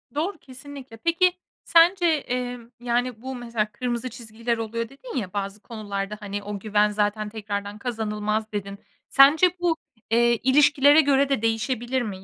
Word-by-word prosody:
Doğru, 340 Hz, +4 st, -1 dB
kesinlikle. 265 Hz, -3 st, -11 dB
Peki, 345 Hz, +6 st, +2 dB, 0.3 s
sence, 345 Hz, +2 st, +5 dB
emm, 245 Hz, -6 st, -2 dB
yani, 245 Hz, -1 st, -1 dB
bu 260 Hz, 0 st, -5 dB
mesela 230 Hz, -3 st, -3 dB
kırmızı 240 Hz, +2 st, -3 dB
çizgiler 230 Hz, 0 st, -4 dB
oluyor 230 Hz, +1 st, -4 dB
dedin 280 Hz, -, -8 dB
ya 200 Hz, -5 st, -4 dB
bazı 200 Hz, +1 st, -4 dB
konularda, 210 Hz, -2 st, -5 dB
hani, 205 Hz, 0 st, -5 dB
o 205 Hz, 0 st, -5 dB
güven 210 Hz, 0 st, +2 dB
zaten 210 Hz, 0 st, -1 dB
tekrardan 205 Hz, -1 st, -5 dB
kazanılmaz 215 Hz, -2 st, -2 dB
dedin. 200 Hz, -1 st, -5 dB, 0.3 s
Sence 290 Hz, +6 st, +6 dB
bu, 340 Hz, -2 st, +1 dB, 0.3 s
eee, 235 Hz, +1 st, +4 dB
ilişkilere 290 Hz, +2 st, +5 dB
göre 280 Hz, -1 st, +2 dB
de 270 Hz, -6 st, 0 dB
değişebilir 240 Hz, +3 st, -1 dB
mi? 195 Hz, -4 st, -6 dB
235 Hz, 145 wpm, -24 LUFS, 210-270 Hz, 0.3 s, Sence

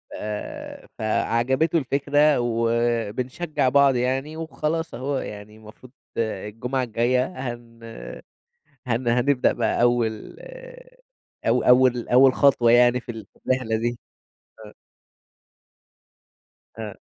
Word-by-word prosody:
آآ 105 Hz, 0 st, -7 dB
فعجبته 125 Hz, +8 st, +1 dB
الفكرة، 145 Hz, +1 st, +2 dB
وبنشجّع 120 Hz, +5 st, -1 dB
بعض 140 Hz, 0 st, +4 dB
يعني، 135 Hz, +5 st, -1 dB
وخلاص 160 Hz, 0 st, -3 dB
أهو 135 Hz, +4 st, -3 dB
يعني 105 Hz, -3 st, -8 dB
المفروض 110 Hz, +3 st, -15 dB, 0.3 s
الجمعة 115 Hz, +3 st, -3 dB
الجاية 120 Hz, +2 st, +1 dB, 0.3 s
هن 115 Hz, -1 st, -16 dB, 1.1 s
هن 120 Hz, +1 st, -1 dB
هنبدأ 125 Hz, +3 st, +2 dB
بقى -, -, 0 dB
أول 120 Hz, -3 st, 0 dB, 1.1 s
أو -, -, +3 dB
أول 125 Hz, -1 st, +4 dB
أول 130 Hz, +1 st, +6 dB
خطوة 135 Hz, -5 st, +4 dB
يعني 120 Hz, +1 st, +5 dB
في 125 Hz, -, -8 dB
ال 110 Hz, -3 st, -9 dB
في -, -, -27 dB
الرحلة 130 Hz, -3 st, 0 dB
دي. 120 Hz, +1 st, -2 dB, 0.7 s
آه. 105 Hz, -, -14 dB, 2.1 s
آه. 105 Hz, -2 st, -5 dB
120 Hz, 100 wpm, -23 LUFS, 115-135 Hz, 2.1 s, أول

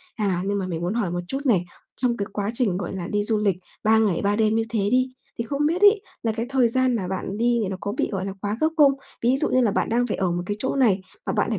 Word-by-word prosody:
À, 195 Hz, -6 st, 0 dB
nhưng 200 Hz, 0 st, 0 dB
mà 185 Hz, -, -3 dB
mình 170 Hz, -2 st, -4 dB
muốn 180 Hz, +4 st, -1 dB
hỏi 210 Hz, -7 st, -1 dB
một 175 Hz, 0 st, -2 dB
chút 270 Hz, -, -2 dB
này, 190 Hz, -8 st, +3 dB, 0.3 s
trong 245 Hz, -2 st, 0 dB
cái 200 Hz, -, -2 dB
quá 205 Hz, 0 st, -2 dB
trình, 220 Hz, -8 st, 0 dB
gọi 190 Hz, 0 st, -4 dB
là, 175 Hz, -2 st, -4 dB
đi 205 Hz, +1 st, 0 dB
du 215 Hz, 0 st, +2 dB
lịch 200 Hz, -4 st, +1 dB, 0.3 s
3 220 Hz, +1 st, +5 dB
ngày 210 Hz, -6 st, +2 dB
3 205 Hz, 0 st, +1 dB
đêm 220 Hz, 0 st, +2 dB
như 225 Hz, -, +2 dB
thế 225 Hz, -2 st, -1 dB
đi, 255 Hz, +1 st, +3 dB, 0.3 s
thì -, -, 0 dB
không 285 Hz, +4 st, -1 dB
biết 340 Hz, +5 st, 0 dB
ấy, 410 Hz, 0 st, +6 dB, 0.2 s
là 225 Hz, -, +1 dB
cái 225 Hz, +2 st, -3 dB
thời 260 Hz, -3 st, +3 dB
gian 255 Hz, +1 st, +2 dB
mà 190 Hz, -5 st, -2 dB
bạn 190 Hz, +2 st, -4 dB
đi 235 Hz, 0 st, +2 dB
thì 195 Hz, -, -2 dB
nó 190 Hz, -, -4 dB
có 205 Hz, -, -2 dB
bị, -, -, +1 dB
gọi 190 Hz, -1 st, -2 dB
là, 195 Hz, -, -4 dB
quá 205 Hz, +1 st, -2 dB
gấp 315 Hz, -, +4 dB
không? 285 Hz, -2 st, +7 dB, 0.3 s
Ví 250 Hz, +3 st, +3 dB
dụ -, -, +2 dB
như 255 Hz, -, +3 dB
là 220 Hz, -4 st, +2 dB
bạn -, -, 0 dB
đang 245 Hz, +2 st, +1 dB
phải 215 Hz, -, -2 dB
ở 185 Hz, -3 st, 0 dB
một 175 Hz, 0 st, -2 dB
cái 205 Hz, -, -2 dB
chỗ 265 Hz, -, -1 dB
này, 215 Hz, -8 st, +3 dB, 0.2 s
mà -, -, -1 dB
bạn -, -, +1 dB
lại 220 Hz, -, -1 dB
215 Hz, 310 wpm, -24 LUFS, 195-245 Hz, 0.3 s, không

